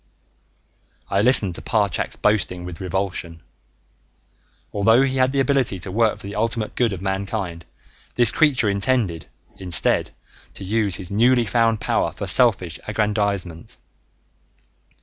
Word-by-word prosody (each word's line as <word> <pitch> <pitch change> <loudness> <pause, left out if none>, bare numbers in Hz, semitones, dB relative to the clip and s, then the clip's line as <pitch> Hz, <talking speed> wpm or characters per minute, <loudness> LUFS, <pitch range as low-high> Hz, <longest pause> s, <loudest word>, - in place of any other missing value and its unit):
I 100 - +2
listened 105 -5 +4
to - - -6
Parchak's 105 -4 -1
boasting 90 -4 0
with 90 -1 -8
revulsion. 90 -3 -4 1.3
Although 115 +5 +4
he 135 -1 -1
had 130 0 +2
the 140 - -1
ability 135 -6 +1
to 95 +2 -6
work 110 +1 +1
for - - -16
the 100 - -7
ultimate 110 +1 -2
good 120 -3 +1
of 95 -1 -6
mankind, 95 -3 -4 0.5
this 120 -2 +5
creature 140 -8 +2
intended, 100 -4 -1 0.3
instead, 90 -7 0 0.5
to - - -8
use 100 -1 0
his 90 -1 -6
newly 120 +3 +3
found 115 0 +1
power - - 0
for - - -6
selfish - - +2
aggrandizement. 100 -6 -2
105 Hz, 130 wpm, -21 LUFS, 95-115 Hz, 1.3 s, this